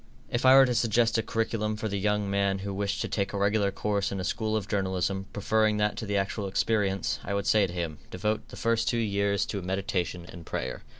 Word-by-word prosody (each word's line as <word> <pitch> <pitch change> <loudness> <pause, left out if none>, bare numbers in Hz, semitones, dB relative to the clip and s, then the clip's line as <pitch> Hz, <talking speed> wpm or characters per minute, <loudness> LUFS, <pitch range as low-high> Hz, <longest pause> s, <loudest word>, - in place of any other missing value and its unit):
If 120 +2 +1
I 130 - +9
were 135 0 +8
to 125 - 0
suggest 115 0 +2
a - - +2
curriculum 110 -1 -1
for 110 +1 -3
the 100 -1 -2
young 105 0 +1
man 100 0 +1
who 100 - -3
wished 100 +1 -2
to - - -1
take 100 -1 -2
a - - -2
regular 100 0 +2
course 100 0 -1
in 100 - -3
a - - -3
school 110 +3 -1
of 100 -3 -4
journalism, 95 -1 -1
preferring 110 +1 +1
that 105 0 +1
to 110 - -4
the 100 0 0
actual 100 +1 -1
experience, 100 -1 0
I 100 - -2
would 100 - -1
say 105 -2 +4
to - - -8
him, 85 -4 -4
devote 105 +3 -2
the - - -11
first 115 -1 +1
two 120 - +1
years 100 -2 +1
to 100 - -4
meditation 90 -2 -2
and 85 -2 -10
prayer. - - -4
100 Hz, 235 wpm, -28 LUFS, 95-110 Hz, -, I